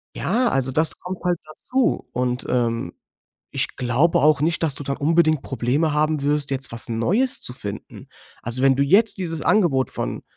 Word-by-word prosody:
Ja, 235 +6 +1
also, 135 - 0
das 155 +4 +1
kommt 180 0 -7
halt 175 -2 0
dazu. 250 +12 -1
Und, 125 0 -2
ähm, 115 -7 -1 0.6
ich - - -2
glaube 130 +7 +2
auch 150 +1 +4
nicht, 165 +2 0
dass 150 -4 0
du - - -3
dann 140 0 -2
unbedingt 155 -1 +2
Probleme 135 +6 0
haben 150 0 +1
wirst, 145 0 0
jetzt 135 0 -3
was 115 -1 -4
Neues 205 - +1
zu 125 - -4
finden. 105 -6 -8 0.3
Also, 120 +2 -1
wenn 135 0 +4
du 140 - +2
jetzt 205 +10 +3
dieses 165 -4 -4
Angebot 150 - +2
von, - - -4
145 Hz, 180 wpm, -22 LUFS, 130-170 Hz, 0.6 s, auch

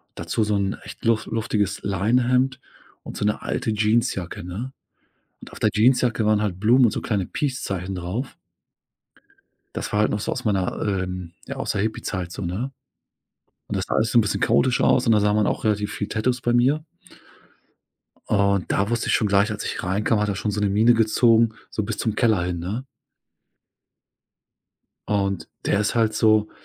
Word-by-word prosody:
dazu 110 - -1
so 105 0 0
'n 100 0 0
echt - - -11
luf 115 -1 +2
luftiges 110 -3 -1
Leinenhemd 125 +6 +1 0.4
und - - -8
so - - -1
'ne 105 - 0
alte 110 - -2
Jeansjacke, 105 -3 0
ne? 100 +9 -6 0.7
Und - - -13
auf - - -11
der - - +3
Jeansjacke 120 -1 +3
waren 105 0 +3
halt 95 -3 -3
Blumen 120 +5 +5
und 115 - +3
so - - -3
kleine 100 -5 -1
Peace 135 +4 -3
Zeichen 95 0 -3
drauf. 90 +9 -4 1.4
Das - - -4
war 105 - +2
halt 105 - +2
noch 105 - -1
so - - -3
aus 125 - -4
meiner, 100 -4 0
ähm, 90 -3 -3
ja, - - -6
aus - - -2
der 100 - -1
Hippiezeit, 95 -5 -3
so, - - -6
ne? 100 +10 -3 1.0
Und - - -4
das - - -2
sah - - -2
alles 110 +1 +1
so - - +3
'n - - +7
bisschen 105 - -2
chaotisch 130 -1 +2
aus. - - +3
Und 115 - +4
da 105 - +4
sah 105 0 +2
man 105 -1 +2
auch - - -2
relativ 105 -1 0
viele 105 - -4
Tattoos 120 +3 -1
bei 120 - +1
mir. 135 +6 +2 1.4
Und 100 -2 +1
da 100 +3 +1
wusste 120 0 -1
ich - - +3
schon 105 - +2
gleich, 100 +2 +3
als 105 0 -4
ich - - -4
reinkam, 105 +4 0
hat 105 - 0
er 100 - -1
schon 105 +2 -2
so 105 0 -2
'ne 105 - +2
Mine 110 +4 +4
gezogen, 115 0 +4 0.2
so 110 - -2
bis 105 +1 -4
zum 110 - -1
Keller 110 -7 +2
hin, 90 -1 -3
ne? 100 +10 -4 2.2
Und 100 -3 -1 0.2
der 100 - +2
ist 105 - 0
halt 115 -2 +2
so, 110 -1 +3
105 Hz, 195 wpm, -23 LUFS, 100-115 Hz, 2.2 s, n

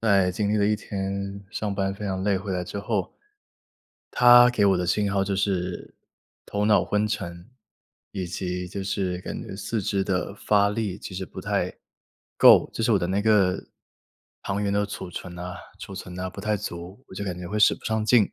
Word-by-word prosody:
在 100 -4 +3
经 105 +2 0
历 - - +2
了 100 -1 +3
一 105 - +3
天 100 -1 -4
上 105 -2 -2
班 95 0 -1
非 105 - -7
常 95 -1 -2
累， 100 -1 +2
回 95 0 -4
来 90 -1 -2
之 100 - -5
后， 105 -2 -2 1.0
它 120 0 +7
给 105 -4 +2
我 95 -1 +4
的 90 - -1
信 100 +3 +1
号 100 -1 +2
就 95 0 -1
是 95 -2 -2 0.5
头 105 0 -2
脑 105 0 +4
昏 105 +1 +1
沉， 85 -3 -5 0.6
以 95 -2 -3
及 90 +1 -4
就 100 +2 -5
是 95 -2 -2
感 - - -6
觉 - - -8
四 110 +3 -3
肢 100 0 0
的 95 +1 -2
发 100 -1 +2
力 105 -3 -3
其 100 - -8
实 95 +1 -3
不 85 - -9
太 - - -1 0.6
够， - - +7
就 - - -2
是 - - +2
我 - - +4
的 85 - -1
那 95 +3 0
个 105 -4 +3 0.8
糖 100 +1 -2
原 100 -1 0
的 100 0 +2
储 100 -2 -6
存 90 0 -7
呐 90 0 -6 0.2
储 100 - -8
存 95 -1 -8
呐 90 +1 -3
不 95 - -9
太 105 +1 0
足， 90 +6 -7
我 - - -11
就 100 - -4
感 90 -2 -4
觉 90 - -6
会 105 - -3
使 105 - +6
不 - - -18
上 110 -1 0
劲。 110 -2 +4
100 Hz, 230 characters per minute, -25 LUFS, 95-105 Hz, 1.0 s, 它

